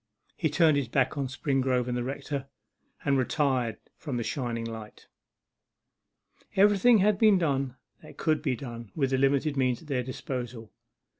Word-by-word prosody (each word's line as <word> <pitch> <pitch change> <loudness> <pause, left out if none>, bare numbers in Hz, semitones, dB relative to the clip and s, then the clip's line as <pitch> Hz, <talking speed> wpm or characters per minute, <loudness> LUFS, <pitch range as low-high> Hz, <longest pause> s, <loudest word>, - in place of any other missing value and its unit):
He 160 - 0
turned 155 -1 +4
his 140 -4 -1
back 130 +4 +1
on 140 -2 -1
Springrove 130 -2 0
and 125 - -1
the 120 - -1
rector, 135 +1 -4 0.6
and 140 -2 +3
retired 130 -4 0 0.2
from 140 -6 -4
the 120 - -1
shining 120 -3 -3
light. 110 -2 -8 1.5
Everything 205 +4 +5
had 205 0 +3
been 215 -3 +6
done 140 -6 0 0.3
that - - -14
could 155 -1 +1
be 125 - 0
done 115 -4 -8
with 135 -4 0
the 130 - +2
limited 140 +2 +2
means 130 -1 0
at - - -16
their 130 -3 0
disposal. 125 -2 -6
135 Hz, 160 wpm, -28 LUFS, 125-150 Hz, 1.5 s, been